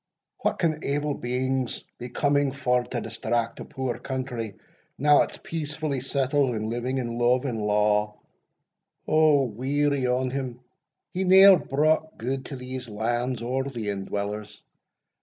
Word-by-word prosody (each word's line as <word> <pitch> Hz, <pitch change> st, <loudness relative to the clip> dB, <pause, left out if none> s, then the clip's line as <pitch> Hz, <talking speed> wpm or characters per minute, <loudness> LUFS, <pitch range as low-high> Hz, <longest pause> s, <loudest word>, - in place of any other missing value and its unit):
what -, -, 0 dB
can 160 Hz, -3 st, 0 dB
evil 145 Hz, +1 st, 0 dB
beings 130 Hz, 0 st, -2 dB, 0.2 s
be 125 Hz, -, -6 dB
coming 145 Hz, +2 st, +2 dB
for 125 Hz, -2 st, +1 dB
to 120 Hz, 0 st, -4 dB
distract 115 Hz, +1 st, -2 dB
a -, -, -6 dB
poor 130 Hz, -3 st, -4 dB
country, 125 Hz, -5 st, -4 dB, 0.4 s
now 145 Hz, +1 st, +5 dB
it's -, -, -2 dB
peacefully 150 Hz, -3 st, -3 dB
settled, 135 Hz, -1 st, +1 dB
and 110 Hz, +1 st, -3 dB
living 125 Hz, +3 st, -2 dB
in 120 Hz, -2 st, -3 dB
love 125 Hz, +2 st, +3 dB
and 115 Hz, -5 st, -2 dB
law 105 Hz, 0 st, +2 dB, 0.9 s
O 155 Hz, -3 st, +5 dB
weary 135 Hz, +3 st, 0 dB
on 125 Hz, +1 st, 0 dB
him! 130 Hz, -3 st, -4 dB, 0.5 s
he 185 Hz, -, -1 dB
ne'er 190 Hz, 0 st, +8 dB
brought 155 Hz, +3 st, +1 dB
gude 130 Hz, +3 st, -3 dB
to 140 Hz, -, -6 dB
these 130 Hz, -1 st, -6 dB
lands 120 Hz, +3 st, -1 dB
or 130 Hz, +2 st, -1 dB
the 120 Hz, -6 st, -4 dB
indwellers. 100 Hz, +1 st, -4 dB
130 Hz, 140 wpm, -26 LUFS, 120-140 Hz, 0.9 s, ne'er